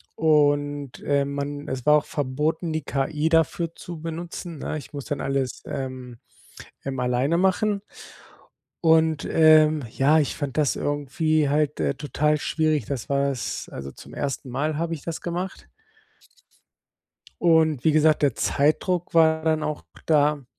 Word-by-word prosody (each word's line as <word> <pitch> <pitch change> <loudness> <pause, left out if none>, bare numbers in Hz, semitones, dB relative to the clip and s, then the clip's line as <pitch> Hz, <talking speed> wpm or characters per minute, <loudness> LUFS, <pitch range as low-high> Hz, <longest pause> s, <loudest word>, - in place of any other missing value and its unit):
und, 145 -3 +1
ähm, 140 0 +1
man 145 +1 -4
es 130 -2 -4
war 150 0 +6
auch 150 - -2
verboten, 150 +4 -2
die 155 -2 -2
KI 150 +3 -1
dafür 165 +1 +1
zu 170 -2 -8
benutzen, 165 -1 -6
ne? 155 - -3
Ich 150 - -10
muss 140 -2 -6
dann 145 -2 -3
alles, 135 -2 -2
ähm, 130 -3 -6 0.7
ähm, 135 -1 -4
alleine 125 +6 +1
machen. 200 +2 +1 1.0
Und, 160 -2 +3
ähm, 155 -2 +5
ja, 145 +6 +3
ich 145 - -2
fand 145 -2 -4
das 145 -3 +2
irgendwie, 145 +1 0
halt, 150 0 0
äh, - - +1
total 150 +1 0
schwierig, 155 -4 0
das 135 -5 -4
war 140 0 +1
es 130 -4 -4
also 70 0 -7
zum - - -14
ersten 135 -1 -4
Mal 150 +4 -1
habe 170 0 -2
ich 150 - -9
das 165 -1 -5
gemacht 180 +2 -5 1.7
und 160 -5 +3
wie 160 - +5
gesagt, 155 0 +3
der 140 -5 +2
Zeitdruck 170 +5 0
war 160 -1 +4
dann 160 -1 +1
auch 150 - -3 0.2
da. 150 -3 +2
150 Hz, 150 wpm, -24 LUFS, 140-160 Hz, 1.7 s, war